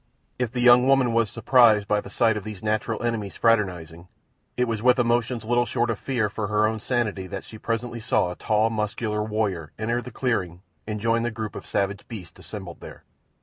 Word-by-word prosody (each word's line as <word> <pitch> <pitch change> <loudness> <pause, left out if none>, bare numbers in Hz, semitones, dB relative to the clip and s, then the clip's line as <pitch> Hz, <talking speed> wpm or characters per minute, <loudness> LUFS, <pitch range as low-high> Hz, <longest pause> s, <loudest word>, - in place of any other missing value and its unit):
If 125 -3 -1
the 125 -1 -2
young 125 +1 +7
woman 135 -3 +4
was 115 -2 +2
surprised 115 -3 +4
by 105 -1 +1
the - - -11
sight 115 -3 +2
of 105 - -4
these 105 -2 -8
natural 110 +2 -1
enemies 110 -4 -2
fraternizing, 90 -7 0 0.5
it 125 0 +2
was 115 -2 -2
with 125 +1 +5
emotions 120 -1 +1
little 120 +1 +2
short 120 -1 0
of 110 - -4
fear 120 -6 0
for 105 0 -4
her 105 +1 +2
own 110 +1 -1
sanity 105 -5 -1
that 95 +1 -6
she 110 - -12
presently 115 +1 -3
saw 90 -4 +1
a - - -7
tall, 110 +3 +1
muscular 105 0 -2
warrior 105 -8 -2
enter 115 +3 -1
the 125 - -8
clearing 95 -8 -2 0.2
and 105 0 -3
join 115 +2 +1
the 120 - 0
group 110 -2 -6
of - - -8
savage 100 -1 -2
beasts 100 -8 -9
assembled 95 -5 -8
there. - - -11
110 Hz, 205 wpm, -25 LUFS, 105-120 Hz, 0.5 s, young